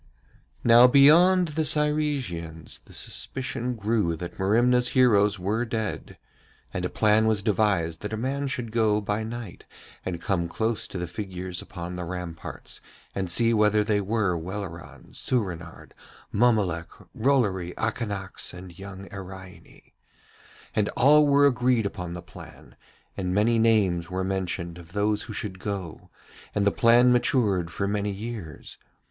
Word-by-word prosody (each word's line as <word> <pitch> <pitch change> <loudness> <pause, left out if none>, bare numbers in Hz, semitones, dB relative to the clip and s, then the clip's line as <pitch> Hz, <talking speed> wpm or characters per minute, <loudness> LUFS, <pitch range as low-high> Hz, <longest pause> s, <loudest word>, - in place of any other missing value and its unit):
Now 120 +1 +8
beyond 170 +7 +6
the 160 +1 -1
Cyresians 145 - -2
the - - -17
suspicion 125 -1 -4
grew 105 -5 0
that 85 +2 -8
Merimna's 120 +5 +3
heroes 105 -5 +4
were 105 +6 -1
dead, 110 -3 -4 0.6
and 90 - -3
a 90 - -1
plan 110 0 +3
was 105 -2 +1
devised 95 -6 +1
that 105 - -5
a 110 - -2
man 135 +4 -2
should 125 -4 -4
go 110 -2 +2
by 105 +1 -2
night 115 -4 -7 0.4
and 90 -2 -4
come 85 -3 -1
close 110 +5 -2
to - - -7
the 90 - -2
figures 90 0 -5
upon 90 0 -7
the 90 - -4
ramparts 90 -1 -6 0.3
and 95 -2 -3
see 115 +6 +3
whether 105 -1 +3
they 105 -1 +1
were 100 -2 0
Welleran, 85 0 -7
Soorenard, 90 -9 -3 0.4
Mommolek, 100 -8 +2 0.3
Rollory, 105 -9 +1
Akanax, 100 -5 -4
and 90 -1 -11
young 95 0 -9
Iraine. 95 -1 -11 0.8
And 105 -1 +1
all 150 +3 +6
were 140 0 +5
agreed 125 -4 +2
upon 90 -4 -4
the 90 0 -7
plan, - - -13 0.4
and 90 -1 -2
many 115 +3 +3
names 100 -7 +2
were 95 +1 -2
mentioned 90 -2 -3
of 85 0 -14
those 105 +1 +1
who 115 -1 -7
should 100 -3 -4
go, 95 -5 -5 0.5
and 100 -1 +1
the 100 - +4
plan 120 +1 +5
matured 105 -8 +2
for 100 +4 -2
many 105 0 -1
years. 100 - -7
105 Hz, 145 wpm, -26 LUFS, 90-115 Hz, 0.8 s, Now